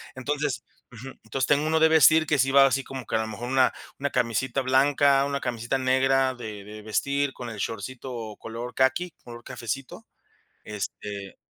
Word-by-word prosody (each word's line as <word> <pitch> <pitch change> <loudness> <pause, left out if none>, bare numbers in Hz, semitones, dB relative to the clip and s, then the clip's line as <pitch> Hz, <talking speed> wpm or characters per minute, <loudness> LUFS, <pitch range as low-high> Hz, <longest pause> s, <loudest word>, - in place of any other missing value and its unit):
Entonces 140 -2 -2 0.3
Ujú. 125 +2 -10
Entonces 135 -2 -1
tengo 145 +1 +2
1 160 0 +2
de 160 - +6
vestir 160 0 +6
que 150 -2 +1
sí 135 +1 +3
va 135 0 +7
así 135 0 +2
como 130 -2 -8
que 110 - 0
a - - 0
lo 110 - -3
mejor 120 +3 -6
una 130 -1 +3 0.3
una 140 0 -1
camisita 125 +2 0
blanca, 135 +1 +3
una 140 0 -2
camisita 120 +1 -2
negra 130 0 +2
de 110 -5 -8
de 105 0 -10
vestir 140 +6 -1
con 120 -2 -7
el 110 - -8
shortcito 115 +1 -5
color 115 +2 -6
caqui, 135 +7 +1
color 120 0 -10
cafecito, 130 +1 -6 0.6
este 100 -1 -6
130 Hz, 175 wpm, -26 LUFS, 115-140 Hz, 0.6 s, va